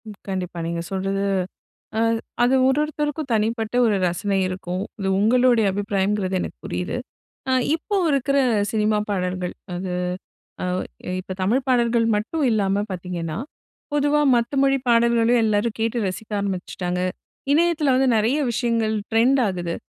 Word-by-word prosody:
ம். 210 - -9
கண்டிப்பா. 185 -3 -4
நீங்க 170 0 -2
சொல்றது 195 +1 -1 0.8
அ - - +2 0.4
அது 250 +2 +4
ஒருவொருத்தருக்கும் 295 +1 -1
தனிப்பட்ட 225 +1 0
ஒரு 215 -3 +3
ரசனை 195 +3 -1
இருக்கும். 185 0 -4 0.2
இது 195 - -2
உங்களுடைய 240 +1 +4
அபிப்பிராயம்ங்கிறது 200 -1 0
எனக்கு - - -5
புரியுது. - - -3 0.5
அ - - +2 0.2
இப்போ 400 +5 -2
இருக்கிற 275 0 +1 0.3
சினிமா 215 -1 +2
பாடல்கள், 180 -2 -2 0.2
அது 180 0 -4 0.7
அ - - -1 0.6
இப்போ 185 - -6
தமிழ் 240 +8 +2
பாடல்கள் 235 -2 +3
மட்டும் 255 +10 -1
இல்லாம 200 -2 +1
பாத்தீங்கன்னா, 170 -3 -4 0.6
பொதுவா 295 +1 +2
மத்த 235 +3 0
மொழி 275 0 +3
பாடல்களையும் 235 0 +4
எல்லாரும் 215 +1 0
கேட்டு 225 +2 0
ரசிக்க 200 +4 -6
ஆரம்பிச்சுட்டாங்க. 180 -2 -3 0.5
இணையத்தில 310 -3 +3
வந்து 265 +1 +3
நெறைய 225 +7 +2
விஷயங்கள் 230 -2 0 0.2
ட்ரெண்ட் 245 +5 +4
ஆகுது. 175 -3 -3
220 Hz, 130 wpm, -23 LUFS, 190-250 Hz, 0.8 s, அது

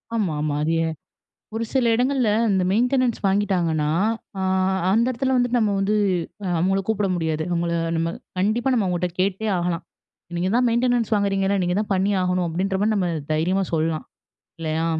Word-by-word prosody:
ஆமா, 205 -7 0
ஆமாங்க. 150 -1 -1
அது 160 - 0
எ - - 0 0.7
ஒரு 230 - -1
சில 260 -3 +2
இடங்கள்ல 255 0 +1 0.2
இந்த 190 -1 +2
மெயின்டெனன்ஸ் 250 +2 +2
வாங்கீட்டாங்கன்னா, 180 -6 +1 0.5
அ - - -1 0.5
அந்த 230 +4 +3
இடத்துல 260 +2 -1
வந்துட்டு 245 0 +2
நம்ம 210 -3 +1
வந்து 200 +2 +1 0.6
அவங்கள 190 +3 +1
கூப்பிட 210 -2 +1
முடியாது. 160 -2 -1
அவங்கள 170 0 0 0.2
நம்ம 165 +1 -1 0.3
கண்டிப்பா 225 +7 +1
நம்ம 225 -5 +2
அவங்கட்ட 180 0 -1
கேட்டே 195 +3 0
ஆகலாம். 175 -1 -2 0.5
நீங்க 185 +2 0
தான் 250 0 +3
மெயின்டெனன்ஸ் 235 -1 +1
வாங்குறீங்கல. 200 -1 +1
நீங்க 180 0 0
தான் 210 - -6
பண்ணி 195 +2 +1
ஆகணும். 180 -1 0
அப்டின்ற 190 +4 -1
மாதிரி 215 +1 +2
நம்ம 185 -3 0 0.2
தைரியமா 180 +5 +1
சொல்லலாம். 160 0 0 0.5
இல்லையா? 160 0 -1
195 Hz, 160 wpm, -23 LUFS, 170-225 Hz, 0.7 s, அந்த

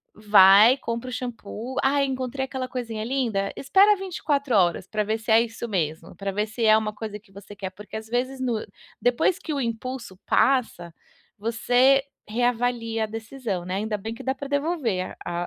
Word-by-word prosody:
vai, 210 +3 +7
compra 235 0 -4
o - - -6
xampu. 245 0 -6
"Ai, 280 +1 +3
encontrei 260 0 -3
aquela 260 -1 -4
coisinha 230 -4 -4
linda", 225 -6 -1
espera 395 +9 +4
24 295 - -1
horas 175 -4 +2
pra 215 -1 -1
ver 220 +2 -1
se 220 - -10
é 220 - +7
isso 235 0 -5
mesmo, 165 -4 -3
pra 195 0 -3
ver 210 +2 -1
se 225 +1 -2
é 215 0 +7
uma 215 -1 -2
coisa 210 -1 -6
que 205 -1 -26
você 200 +1 -12
quer, 195 -2 -5
porque 205 +3 -11
às 220 0 -8
vezes 255 +3 -2
no 240 -4 -1 0.4
depois 245 +9 +2
que 315 - -5
o 280 - -1
impulso 230 -3 -5
passa, 235 -10 +1 0.5
você 245 +5 +3 0.2
reavalia 235 0 0
a - - -1
decisão, 225 -4 -5
né, 185 +1 -3
ainda 210 +1 -2
bem 225 +3 -6
que - - -10
dá 265 - 0
para 275 +1 -7
devolver 285 - -1
a 175 0 -3
230 Hz, 185 wpm, -25 LUFS, 210-260 Hz, 0.5 s, vai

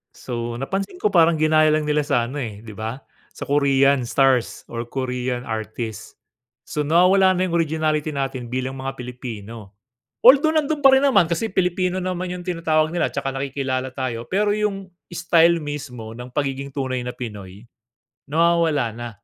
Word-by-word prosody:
So, 120 -1 -5
napansin 195 - -4
ko - - +3
parang 170 -3 +5
ginaya 155 0 +4
lang 155 -1 0
nila 150 -1 +1
sa 120 -3 +1
ano, 145 - -6
eh, 110 -6 -5
di 115 - -12
ba, 110 +5 -5 0.3
sa - - -8
Korean 140 -2 +3
stars 130 -1 +1
or 115 0 -4
Korean 125 0 -3
artists. 110 -1 -5 0.6
So, 150 -1 -2
nawawala 185 +4 +5
na 185 0 0
yung 170 - +1
originality 155 -1 0
natin 135 -3 -3
bilang 130 +2 -4
mga 135 0 -4
Pilipino. 115 -5 -8 0.5
Although, 285 +5 +7
nandun 290 -1 -3
pa 270 - +9
rin 265 - +5
naman 245 -11 +5
kasi 170 +7 -2
Pilipino 180 0 0
naman 185 -1 -3
yung 180 -1 -6
tinatawag 165 -3 0
nila 175 - +1
tsaka 135 -1 -3
nakikilala 135 -1 -2
tayo, 130 -3 -5
pero 205 +2 +1
yung 210 -2 -2 0.2
style 170 -1 +3
mismo 140 -7 -6
ng 125 +2 -9
pagiging 140 0 -3
tunay 130 -2 -3
na 125 0 -4
Pinoy, 105 -4 -9 0.6
nawawala 160 -5 +2
na. 120 +2 -7
140 Hz, 160 wpm, -22 LUFS, 125-170 Hz, 0.6 s, pa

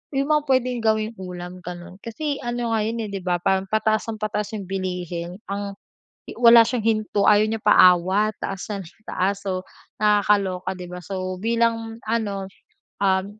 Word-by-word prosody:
'yung 275 +2 0
mga 300 0 +4
puwedeng 255 -2 +1
gawing 220 0 +1
ulam 180 0 -7
gano'n. 180 +1 -8
Kasi 280 +6 -4
ano 240 -1 -3
nga 220 - +2
'yun, 230 +1 -2
eh, - - -8
'di 195 - -3
ba, 175 -1 +1
parang 190 0 +1
pataas 220 0 +1
ng 220 -1 -5
pataas 210 0 -2
'yung 200 - -5
bilihin 180 -2 -4 0.2
ang 200 0 -4 0.7
wala 235 -1 +9
siyang 235 -2 -1
hinto 215 -2 +1
ayaw 210 0 +6
niya 225 -1 -2
paawat, 190 +2 +5
taas 195 -1 -4
ng 200 -1 -4 0.3
taas. 200 +2 -1
So 185 -1 -1 0.4
nakakaloka 200 -3 +2
'di 180 -1 -8
ba, 180 - -6
so 185 -1 -4
bilang 230 0 0
ano, 200 -4 -1 0.6
um, 190 -1 +3
205 Hz, 165 wpm, -23 LUFS, 185-225 Hz, 0.7 s, wala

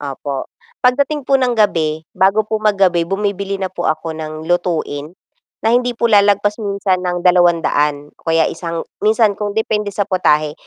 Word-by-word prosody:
Opo, 140 -1 -5 0.4
pagdating 280 +3 +2
po 270 0 +2
ng 245 -2 +1
gabi, 160 -7 +1
bago 195 +3 +2
po 215 0 -2
magabi 190 -5 +2
bumibili 200 0 -2
na 190 -1 -4
po 175 -2 -2
ako 160 +1 -2
ng 155 0 -7
lutuin, 170 -2 -2 0.5
na 225 - +3
hindi 245 -1 +1
po - - -2
lalagpas 205 -1 +3
minsan 200 -2 -1
ng 180 -1 -3
200 165 -5 +2
o - - -9
kaya 165 0 +3
isang 165 0 -4 0.2
minsan 215 0 +3
kung 205 +1 -5
depende 210 -2 0
sa 200 0 -1
putahe 155 -6 +1
190 Hz, 165 wpm, -17 LUFS, 165-210 Hz, 0.5 s, na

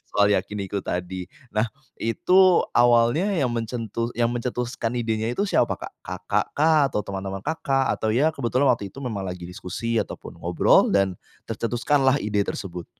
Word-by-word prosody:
soal 105 0 +4
yakiniku 100 0 -1
tadi 90 0 -4 0.2
nah 105 +2 +1 0.3
itu 180 +10 +4
awalnya 120 +7 +4
yang 140 -7 +1
mencetus 115 0 -3
yang 120 0 +1
mencetuskan 120 -1 -3
idenya 110 -2 -1
itu - - 0
siapa 205 - +2
Kak? - - -8 0.2
Kakak 95 +2 -1
kah? 155 +1 +4
Atau 105 -5 -2
teman-teman 95 0 -5
Kakak? 135 -4 0
Atau 110 0 0
ya 150 +6 +3
kebetulan 130 0 +1
waktu 110 -5 0
itu 135 +8 -10
memang 105 -6 -3
lagi 90 -1 -6
diskusi 115 +6 -3
ataupun - - -5
ngobrol - - +3
dan, 95 -2 +2 0.2
tercetuskanlah 130 +4 +1
ide 105 -1 0
tersebut. 90 -3 -5
115 Hz, 150 wpm, -24 LUFS, 100-125 Hz, 0.3 s, soal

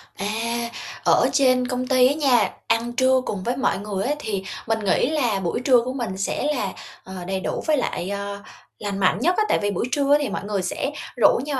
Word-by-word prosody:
À, 230 +3 -2 0.3
ở - - +4
trên 255 -2 +3
công 255 0 -2
ty 255 -1 +5
á 270 - +2
nha, 255 -9 +3 0.2
ăn 230 +1 +1
trưa 260 +1 +3
cùng 195 -3 -3
với 245 +4 -1
mọi 265 - +1
người 200 -1 -3
á 285 - +1
thì 200 -7 -3 0.2
mình 225 0 +1
nghĩ 210 +5 +2
là 245 -10 +1
buổi 175 +2 -2
trưa 250 -2 +5
của 255 +2 -4
mình 230 -8 -4
sẽ 195 - -2
là, 200 -7 -2 0.3
ờ, 190 - -10
đầy 190 0 -1
đủ - - -3
với 310 -1 +3
lại, 190 -7 -2
ờ, 200 0 -4 0.4
lành 200 -2 -3
mạnh 185 0 +3
nhất 350 +9 +2
á. 430 - +4
Tại - - +3
vì 205 0 0
buổi 200 - -1
trưa 285 +1 +4
thì 285 - -1
mọi - - -4
người 205 -1 -2
sẽ 190 +9 -2 0.3
rủ 235 - +5
nhau 285 -3 -2
235 Hz, 230 wpm, -23 LUFS, 200-260 Hz, 0.4 s, ty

